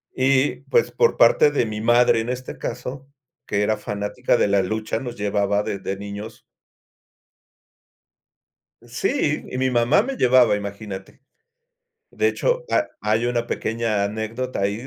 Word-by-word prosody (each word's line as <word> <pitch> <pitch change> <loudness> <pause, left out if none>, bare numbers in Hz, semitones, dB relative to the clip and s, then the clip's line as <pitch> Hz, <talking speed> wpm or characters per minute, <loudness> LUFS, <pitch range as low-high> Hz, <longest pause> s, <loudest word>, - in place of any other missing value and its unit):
Y 130 +1 +2
pues, 470 -1 +2
por 470 - +2
parte 150 - +5
de 130 -5 +1
mi 105 0 -5
madre, 120 0 +4
en 115 - -5
este 130 +1 -5
caso, 130 +2 -6 0.4
que 100 - -1
era 110 +1 +1
fanática 105 +5 -1
de - - +2
la 100 -1 +3
lucha, 110 +3 -2
nos 120 -2 -6
llevaba 100 0 0
desde 95 0 -4
niños. 100 +2 -8 2.4
Sí, - - -1
y 130 - -4
mi 130 0 +1
mamá 120 - +3
me 270 +2 -4
llevaba, 125 - +4
imagínate. 100 0 -7 0.9
De 435 - +1
hecho, - - 0
ha 310 - +1
hay 110 +3 +1
una 120 -1 -1
pequeña 110 -3 -1
anécdota 110 +5 -4
ahí 105 +6 -2
115 Hz, 140 wpm, -22 LUFS, 105-130 Hz, 2.4 s, parte